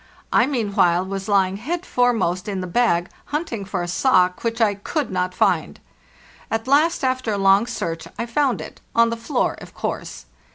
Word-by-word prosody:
I, 245 - +5
meanwhile, 200 -9 +2
was 195 0 -5
lying 195 -2 +2
head 335 - -4
foremost 220 -7 +1
in 195 -2 -2
the 185 - -3
bag, 175 -3 +1 0.2
hunting 290 -9 -3
for 185 -2 -3
a - - -4
sock 180 -2 +2
which 230 0 -1
I 220 -3 +3
couéd 250 +8 -3
not 180 0 -1
find. - - +1 0.7
At 225 +2 -2
last, 300 +5 +3
after 255 -3 0
a - - -1
long 195 +3 +4
search, 165 -6 -4
I 230 - -2
found 260 +2 0
it—on 230 0 0
the - - -1
floor, 230 0 -1
of - - -12
course. - - -5
215 Hz, 175 wpm, -22 LUFS, 185-245 Hz, 0.7 s, I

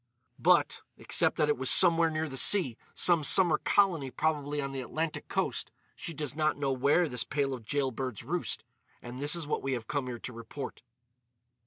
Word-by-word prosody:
"But, - - +2 0.2
except - - +1
that 150 - +2
it 150 - +1
was 130 - +2
somewhere 170 -2 +6
near 160 0 -3
the 135 - -8
sea—some 165 - +2
summer 170 +1 +5
colony 175 -9 +1
probably 150 0 -2
on 140 -1 -3
the 135 -1 -5
Atlantic 155 +5 -4
coast—she 165 - -5
does 145 -2 -4
not 155 -1 0
know 140 -2 -1
where 140 +7 +2
this 125 -5 -2
pair 145 -2 -1
of 125 -3 -8
jailbirds 130 -4 -3
roost. - - -3 0.4
And 125 +2 -8
this 145 +3 +4
is 170 -2 -3
what 150 - -2
we 135 0 -2
have 120 -3 -4
come 140 +2 -3
here 120 -1 -5
to 125 - -8
report." 115 +4 -8
145 Hz, 180 wpm, -29 LUFS, 130-160 Hz, 0.4 s, somewhere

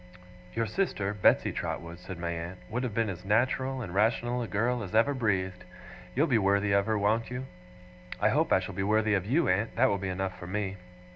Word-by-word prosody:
'Your 115 0 +1
sister, 105 - -1
Betsey 105 - +3
Trotwood,' 85 +1 -5
said 95 0 -8
my 85 0 -3
aunt, 85 +2 -5
'would 125 +3 -1
have 125 -4 -3
been 115 -1 +1
as 90 -3 -5
natural 130 +5 +1
and 90 -5 -7
rational 120 +4 +1
a 115 - -3
girl 120 +4 0
as 100 0 -5
ever 115 +6 +4
breathed. 95 -7 -1 0.5
You'll 145 +5 +4
be 125 -8 +3
worthy 100 0 +2
of 100 +1 +3
her, 110 -1 +1
won't 110 +3 +1
you?' 125 +1 -4 0.7
'I - - +3
hope - - +1
I - - +6
shall - - -6
be 95 - -3
worthy 110 +2 +2
of 95 -1 0
YOU, 155 +9 +2
aunt. 105 +5 +1
That - - +4
will 100 -1 0
be 95 0 -3
enough 95 0 -3
for 90 - -8
me. 100 0 -2
105 Hz, 220 wpm, -29 LUFS, 95-115 Hz, 0.7 s, I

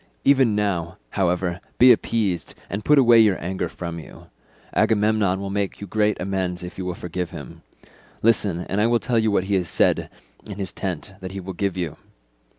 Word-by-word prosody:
Even 130 -6 +4
now, 95 -4 -1
however, 90 -2 0 0.2
be 125 +1 +8
appeased, 110 -6 0 0.2
and 100 +2 -3
put 150 - +4
away 120 -3 +7
your 105 -4 +4
anger 95 +2 -3
from 85 -1 -6
you. 80 - -13 0.4
Agamemnon 105 -3 +2
will 100 0 -4
make 100 -1 -2
you 100 - -6
great 105 +1 0
amends 90 -1 -2
if 90 - -7
you 95 - -3
will 90 -1 -3
forgive 90 0 -4
him; - - -10 0.6
listen, 105 -6 +2
and 100 +3 -1
I 110 - +4
will 120 0 +3
tell 115 0 0
you 110 0 +2
what 100 -3 +2
he 100 +1 -2
has 90 -3 +1
said - - +2 0.4
in 105 - -6
his 95 -2 -5
tent 95 -1 -4
that 95 0 -7
he 100 - -5
will 95 0 -6
give 95 +1 -2
you. 85 -5 -3
95 Hz, 195 wpm, -23 LUFS, 90-105 Hz, 0.6 s, be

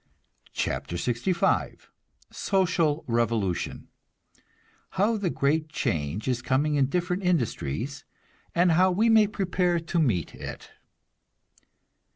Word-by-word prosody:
CHAPTER 85 - -2
LXV 120 - 0 0.4
SOCIAL 170 -6 +1
REVOLUTION 115 -6 -1 1.1
(How 210 +4 +3
the 200 -4 -1
great 155 +1 0
change 95 - -2
is 125 -2 0
coming 140 +4 +1
in 140 -2 +3
different 180 +4 -1
industries, 135 - -1 0.5
and 175 0 +4
how 185 +3 +4
we 210 +6 +2
may 220 -2 +6
prepare 180 -3 0
to 165 +1 -2
meet 110 - 0
it.) - - -8
155 Hz, 105 wpm, -26 LUFS, 120-180 Hz, 1.1 s, may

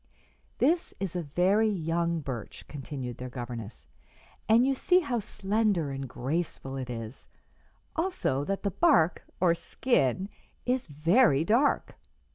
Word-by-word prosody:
"This 330 +6 +1
is 190 -3 -3
a 175 - 0
very 185 +8 +2
young 170 -3 0
birch," 130 -6 -6
continued 135 -4 -6
their 125 0 -5
governess, 120 -4 -7 0.6
"and 230 +3 +6
you 270 - +3
see 360 +7 +3
how 260 -7 -1
slender 200 -6 0
and 135 -1 -5
graceful 135 0 -3
it 130 -2 -5
is; 115 0 -6 0.7
also 325 - 0
that 195 +3 -2
the 200 - 0
bark, 180 - +3 0.2
or 175 -2 +4
'skin,' 185 - 0 0.4
is 250 0 0
very 160 - +4
dark. 240 - +2
170 Hz, 130 wpm, -29 LUFS, 135-225 Hz, 0.7 s, and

